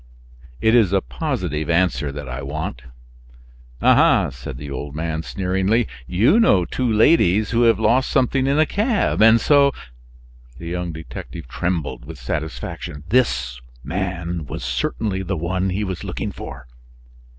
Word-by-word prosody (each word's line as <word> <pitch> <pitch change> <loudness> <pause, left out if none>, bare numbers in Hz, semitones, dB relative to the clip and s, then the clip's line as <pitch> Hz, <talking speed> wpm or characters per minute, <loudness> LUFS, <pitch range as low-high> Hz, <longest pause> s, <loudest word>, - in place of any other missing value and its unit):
"It 110 - +3
is 110 -6 +4
a 95 - +4
positive 90 - -3
answer 85 -4 +1
that 75 0 -7
I 60 +1 -5
want." 70 -2 -5 1.0
"Aha!" - - +5
said 65 0 -8
the 70 +1 -8
old 70 +2 -6
man 80 0 -2
sneeringly, 95 +6 0 0.2
"you 110 - +3
know 95 - +4
two 125 +4 -1
ladies 110 - +4
who 115 0 +2
have 115 -3 +5
lost 120 +4 +2
something 130 +1 +1
in 140 +2 +2
a 155 - +5
cab, 210 - 0
and 115 +1 +7
so 140 +3 +4 0.4
" - - -25
The 85 - -9
young 90 0 -3
detective 80 -1 -8
trembled 75 -5 -3
with 80 +1 -9
satisfaction. 75 +2 -5
This 65 - +1 0.2
man 85 -3 -3
was - - -6
certainly 95 - -2
the 95 0 -3
one 90 +3 -1
he 95 +3 -1
was 95 -4 -4
looking - - -4
for. 65 -1 -9
90 Hz, 150 wpm, -21 LUFS, 75-110 Hz, 1.0 s, and